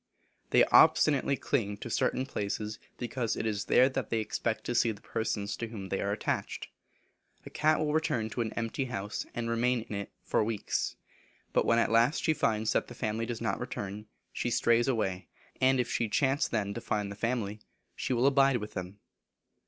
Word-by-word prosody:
They - - +6
obstinately 140 -2 +5
cling 105 -7 -1
to - - -7
certain 130 - +1
places, 105 -3 -3 0.2
because 120 -1 -2
it - - -3
is 105 -2 -1
there 130 - +5
they 130 -4 -1
expect 110 0 -2
to 120 - -2
see 120 -1 +3
the 100 - -9
persons 105 -2 -2
to 115 - -3
whom 100 -4 -7
they 95 - -1
are 100 - -1
attached. 105 - -2 0.8
A - - -9
cat 155 0 +3
will 150 -1 0
return 140 -8 +1
to 120 - -2
an 110 -2 -2
empty 115 +4 -2
house, 105 -4 -4
and 120 -1 -2
remain 120 +1 +1
in 110 - -8
it 100 0 -4 0.2
many - - +4
weeks. 110 -2 -2 0.6
But - - +2
when 115 - +4
at 115 - +2
last 115 +6 +3
she 160 - +3
finds 110 -6 +1
that - - +1
the 120 - -10
family 115 -1 -2
does 120 -2 -4
not - - -1
return, 100 +2 -5 0.3
she - - -1
strays 115 +1 +3
away, 95 -8 -1 0.3
and 130 0 +4
if 125 - +1
she 115 - 0
chance 135 +5 +2
then 100 -3 -1
to 115 - -5
find 105 -3 -2
the - - -6
family, 110 -2 -2 0.4
she - - -3
will 125 0 +2
abide 135 -1 +5
with 105 -2 -7
them. 90 +1 -6
115 Hz, 195 wpm, -30 LUFS, 105-125 Hz, 0.8 s, They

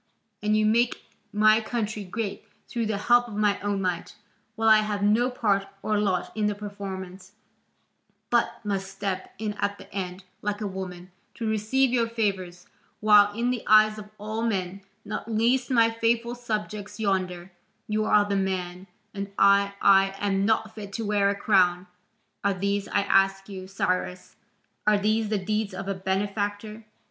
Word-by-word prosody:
And 210 +1 +2
you 215 - +2
make 235 +3 +2 0.3
my 215 +1 +4
country 215 -2 -3
great 200 +2 -5 0.2
through 230 -2 -2
the 215 -2 -1
help 240 +3 +3
of 220 - -8
my 205 -1 +2
own 200 -1 -2
might, 180 -2 -3 0.4
while 225 0 0
I 215 -1 +8
have 210 -1 -2
no 220 +5 +3
part 200 -5 0 0.2
or 215 -1 +1
lot 190 -4 -1
in 215 -1 +1
the 210 - -1
performance, 195 -2 -7 1.0
but 235 -1 +1
must 195 -1 -2
step 195 -1 -4
in 215 0 -3
at 200 0 -1
the - - -15
end, 185 -1 -4 0.2
like 205 0 -2
a 215 - -3
woman, 185 -2 -6 0.2
to 230 - -4
receive 220 +5 +1
your 230 -2 +2
favours, 190 -6 -2 0.3
while 210 -1 +6
in 240 +2 0
the 245 -3 -2
eyes 215 0 +5
of 210 0 -10
all 215 +2 -4
men, 195 -4 -2 0.2
not 215 +2 -5
least 240 +3 +2
my 230 -3 +4
faithful 230 +1 0
subjects 210 -3 -5
yonder, 185 -3 -1 0.4
you 215 0 0
are 210 -1 +4
the 200 -1 -1
man, 185 -1 -2 0.3
and 200 -1 -5
I 200 0 +4
I 195 0 +5
am 195 -1 0
not 220 -1 +1
fit 205 -2 -9
to 225 - -3
wear 205 -1 +2
a 200 - 0
crown. 185 -3 +3 0.6
Are 200 -1 +1
these, 200 +1 -1
I 200 - +1
ask 195 -1 +2
you, 190 -1 -7
Cyrus, 185 -1 -2 0.5
are 210 -1 +5
these 215 +1 +1
the 210 - +1
deeds 210 +1 -2
of 195 +1 -6
a 195 - 0
benefactor? 205 +3 -3
205 Hz, 170 wpm, -26 LUFS, 195-220 Hz, 1.0 s, I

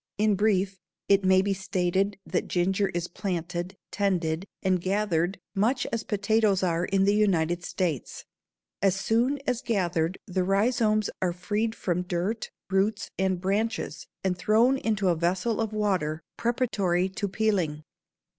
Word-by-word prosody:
In 210 0 +3
brief 195 -2 +1 0.3
it 200 0 +4
may 190 0 +5
be 200 0 +1
stated 190 +1 0
that 165 +2 -1
ginger 190 +3 +1
is 175 0 -3
planted, 175 0 -4
tended, 180 -3 0 0.2
and 185 -2 +2
gathered 190 -2 0 0.2
much 235 +6 +1
as 230 -1 -1
potatoes 210 -1 +2
are 170 -1 +1
in 195 0 +2
the 200 +1 +4
United 175 -5 +2
States. 170 -8 -3 0.6
As 195 -1 +3
soon 235 +8 +1
as 250 -1 0
gathered 180 -6 0
the 185 -2 -1
rhizomes 215 +2 +2
are 180 -2 +1
freed 210 +5 -1
from 180 -1 -1
dirt, 185 +5 -2 0.2
roots, 200 +2 +1
and 190 -1 +1
branches 195 -5 -2 0.2
and 190 -1 +1
thrown 220 +9 +3
into 210 -5 +1
a 175 - +3
vessel 180 +7 0
of 220 -1 -1
water 185 -8 0
preparatory 205 -7 +1
to 200 +2 -3
peeling. 185 -8 0
195 Hz, 145 wpm, -27 LUFS, 180-215 Hz, 0.6 s, may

